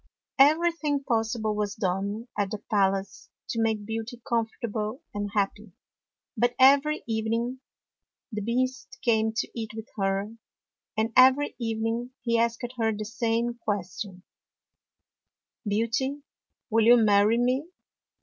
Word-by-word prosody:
Everything 305 -1 +3
possible 225 -3 0
was 210 -1 -2
done 200 +3 -2
at 205 -2 0
the 215 - -3
pal 195 -2 +4
ace 195 0 -8 0.2
to 230 - -1
make 220 -2 0
Beauty 225 +2 -5
comfortable 230 +1 -2
and 205 0 -3
happy; 200 -1 -1 0.6
but 240 +1 +1
every 280 +3 +5
evening 230 +3 -1 0.7
the 210 -1 -3
Beast 255 +4 -2
came 220 -3 +2
to 225 - -1
eat 220 -2 -5
with 220 0 -8
her, 195 +3 -1 0.6
and 225 +1 0
every 265 +3 +5
evening 225 +2 -2
he 235 -1 +2
asked 235 +1 0
her 225 -1 +2
the 215 0 -4
same 235 +1 -1
question, 190 -2 -4 0.8
" - - -21
Beauty, 255 +7 -1 0.5
will 225 0 +4
you 240 +1 +8
marry 210 0 +4
me? 255 +5 +1
225 Hz, 130 wpm, -27 LUFS, 210-245 Hz, 0.8 s, you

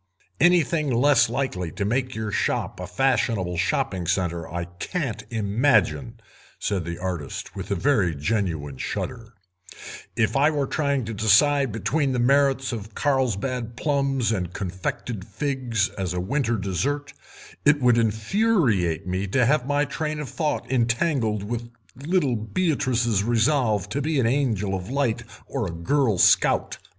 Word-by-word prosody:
"Anything 165 -3 +3
less 135 +4 +4
likely 90 -11 -2
to 100 - -2
make 125 +4 -1
your 110 -1 -3
shop - - -1
a 90 - -5
fashionable 100 -4 0
shopping 95 0 -1
centre 85 -2 -1
I 85 0 -3
can't 115 - -4
imagine," 115 +2 +1 0.4
said 95 -5 -2
the 85 0 -4
artist, 90 -6 -5
with 95 - -6
a 100 - +1
very 100 - +2
genuine 75 - -2
shudder; 115 -3 -5 0.8
"if 110 -2 +1
I 140 +3 +4
were 145 -3 0
trying 140 -3 0
to 115 - -5
decide 125 +6 +4
between 135 +5 0
the - - 0
merits 135 +1 +3
of 105 -3 -7
Carlsbad 125 -3 -1
plums 135 -5 0
and 90 -5 -2
confected 95 +2 -4
figs 120 -1 -1
as 95 -3 -4
a - - -1
winter 120 +4 0
dessert 135 - -2 0.5
it 145 0 +4
would 125 -2 +4
infuriate 110 - +1
me 95 +2 -2
to 125 +5 +2
have 135 0 +2
my 145 +1 +2
train 155 0 -3
of 150 - -5
thought 155 -3 -2
entangled 120 -3 +1
with 120 +2 -4 0.3
little 145 -1 0
Beatrice's 120 - 0
resolve 115 -3 +2
to 140 +7 -2
be 155 0 0
an 125 - +2
Angel 115 -6 0
of 95 0 -4
Light 135 -4 0 0.2
or - - -3
a - - -4
girl 110 - +1
scout. - - +3
115 Hz, 145 wpm, -24 LUFS, 100-140 Hz, 0.8 s, less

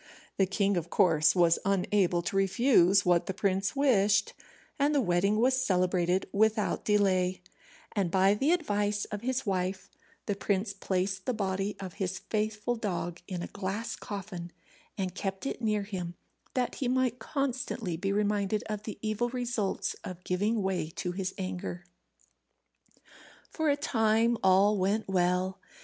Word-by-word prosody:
The 195 - +3
king, 200 0 +1
of 170 0 -3
course, 165 -5 +4
was 170 -2 +4
unable 190 -2 +1
to 175 - -3
refuse 195 -2 +4
what 175 -1 +3
the 190 - -3
prince 195 +2 0
wished, 205 -7 +3 0.5
and 290 +2 +2
the - - +4
wedding 200 0 +2
was 255 +2 +3
celebrated 180 -3 +1
without 215 +1 +1
delay; 185 -3 +2 0.5
and 195 -4 +1
by 190 +2 +4
the 270 +9 +1
advice 210 -11 0
of 205 -1 -4
his 260 +2 -1
wife 190 -1 -2 0.3
the 205 - 0
prince 200 +1 -1
placed 190 0 -2
the 255 - 0
body 195 0 -1
of 190 -3 -6
his 190 0 -1
faithful 215 +3 -2
dog 175 -6 -3
in 180 -2 -4
a - - -4
glass 200 +3 -4
coffin, 190 -4 -7 0.5
and 190 -3 -2
kept 195 +1 -4
it 275 - -3
near 215 -2 +1
him, 180 -4 -5 0.4
that 250 -2 0
he 255 - +1
might 250 -1 +1
constantly 255 - -2
be 195 +4 -2
reminded 205 0 0
of 210 -1 -4
the 215 -1 -7
evil 215 +3 0
results 240 -5 -2
of 180 -1 -8
giving 205 +4 0
way 185 -4 -1
to 180 - -3
his 185 0 -3
anger. 180 -2 -5 1.7
For 315 -2 0
a 285 - +2
time 230 -4 +2
all 195 +2 +4
went 200 +4 0
well. 185 0 +1
200 Hz, 155 wpm, -29 LUFS, 185-220 Hz, 1.7 s, course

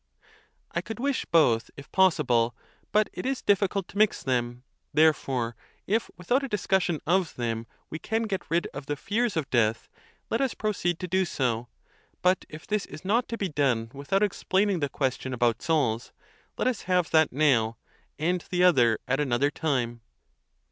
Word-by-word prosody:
f - - -40
A. - - -14
I - - -3
could 220 +4 -7
wish 275 +1 0
both, 120 -9 +3
if 140 - -11
possible; 125 -11 +3 0.4
but 215 0 +3
it - - -5
is 265 0 -2
difficult. 200 -1 +1
to 200 - -6
mix 215 -1 +3
them: 120 -1 -1 0.3
therefore, 135 -6 +2 0.3
if 220 +3 0
without 245 +10 +1
a 275 - -3
discussion 190 - 0
of 175 +1 +1
them 115 -1 -3 0.2
we 155 - -4
can 225 +5 -1
get 195 -6 -4
rid 170 +1 +1
of 140 -1 -7
the 145 - -1
fears 210 - -1
of 155 -4 -1
death, 115 -2 +1 0.4
let 230 - +1
us 265 -3 0
proceed 180 -5 -1
to 180 - -3
do 190 +2 +2
so; 125 -8 -1 0.6
but 185 0 +3
if 155 0 -10
this 210 -1 -1
is 155 - -11
not 230 +5 +2
to 230 - -3
be 195 -4 -2
done 130 -7 0
without 145 +9 0
explaining 195 -1 +1
the 145 -2 -1
ques 130 -2 -1
tion 130 -1 -4
about 120 -2 +1
souls, 125 -8 0 0.5
let - - 0
us 255 -5 0
have 180 -2 +2
that 160 -1 +4
now, 125 -6 +2 0.4
and 175 +3 0
the 180 0 +1
other 120 -11 +5
at 135 +2 +1
an 145 -4 -1
other 140 +5 +2
time. 120 -7 -1
155 Hz, 185 wpm, -27 LUFS, 125-195 Hz, 0.6 s, other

